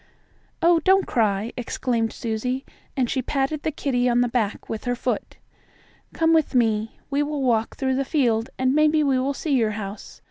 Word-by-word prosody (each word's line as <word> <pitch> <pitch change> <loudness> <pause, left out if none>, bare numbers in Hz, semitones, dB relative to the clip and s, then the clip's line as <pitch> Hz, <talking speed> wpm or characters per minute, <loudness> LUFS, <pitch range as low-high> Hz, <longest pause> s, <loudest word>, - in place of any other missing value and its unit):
"Oh, 340 0 +5
don't 380 +4 +3
cry!" 215 -1 0
exclaimed 235 -2 -1
Susie, 250 +4 -3 0.3
and 255 -2 +2
she 260 +2 -1
patted 275 +3 -1
the - - -1
kittie 250 -4 0
on 240 0 +3
the 245 - +2
back 230 -4 -2
with 220 +1 -5
her 245 0 0
foot. - - -3 0.7
"Come 325 0 +2
with 315 -4 +2
me. 225 -2 +1
We 280 +1 +1
will 295 -1 -2
walk 230 -3 +1
through 265 -2 0
the 275 - +1
field, 240 -6 +1
and 260 0 +2
maybe 305 +1 +4
we 270 -3 +2
will 275 +2 -1
see 300 0 -2
your 225 -5 +2
house. 200 0 -7
255 Hz, 185 wpm, -23 LUFS, 230-285 Hz, 0.7 s, Oh